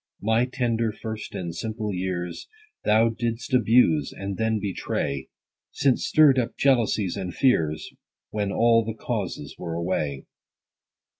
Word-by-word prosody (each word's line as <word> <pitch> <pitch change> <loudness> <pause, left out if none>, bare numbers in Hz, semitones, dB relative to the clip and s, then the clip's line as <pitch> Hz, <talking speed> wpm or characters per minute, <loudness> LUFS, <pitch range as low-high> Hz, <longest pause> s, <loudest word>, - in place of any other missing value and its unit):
40 - - -10
My 110 +2 +3
tender, 115 -3 0
first, 110 0 -7
and 85 -2 -4
simple 110 0 -3
years 90 -2 -3 0.4
Thou 110 +2 +4
didst 115 +3 -3
abuse, 125 +5 +4
and 100 0 -5
then 110 +1 0
betray; 70 -9 -3 0.4
Since 135 -3 +1
stirr'dst 145 -4 +6
up 120 -1 -3
jealousies 115 -8 +2
and 95 -3 -4
fears, 80 - +1 0.4
When 105 -2 -1
all 115 +1 +4
the 110 0 -5
causes - - -4
were 85 -2 -4
away. 80 -5 -2
110 Hz, 135 wpm, -25 LUFS, 95-115 Hz, 0.4 s, stirr'dst